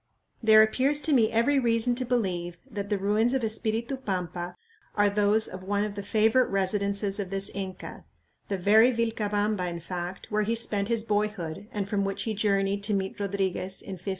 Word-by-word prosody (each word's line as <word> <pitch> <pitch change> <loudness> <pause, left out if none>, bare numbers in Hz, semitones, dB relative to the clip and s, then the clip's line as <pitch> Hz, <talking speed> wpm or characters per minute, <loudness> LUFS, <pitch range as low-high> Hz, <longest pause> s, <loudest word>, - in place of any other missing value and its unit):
There 220 -1 +7
appears 265 +6 +2
to 310 - +2
me 225 -5 +4
every 250 +5 +3
reason 235 0 +2
to 255 +1 -2
believe 180 -8 -1
that 205 -5 -5
the 205 - +1
ruins 210 +6 +1
of 260 - -1
Espiritu 225 +3 -1
Pampa 180 -6 -4 0.4
are 205 -1 +3
those 210 +2 +3
of 185 - -8
one 205 +2 0
of 210 -1 -3
the 200 - -5
favorite 220 +5 +2
residences 200 +1 0
of 195 -3 -3
this 195 0 -1
Inca 190 -2 -7 0.4
the 200 - -2
very 215 +6 +5
Vilcabamba, 210 -4 -1
in 170 0 -5
fact, 175 +3 -6
where 210 0 +1
he 220 +2 0
spent 205 -3 0
his 230 -1 0
boyhood 205 -4 -2
and 205 -4 -3
from 200 -1 0
which 195 0 -2
he 220 - -2
journeyed 200 -1 0
to 205 0 0
meet 190 0 -3
Rodriguez 195 -1 -2
in 195 - -7
1565. 185 +2 -7
205 Hz, 190 wpm, -27 LUFS, 195-225 Hz, 0.4 s, There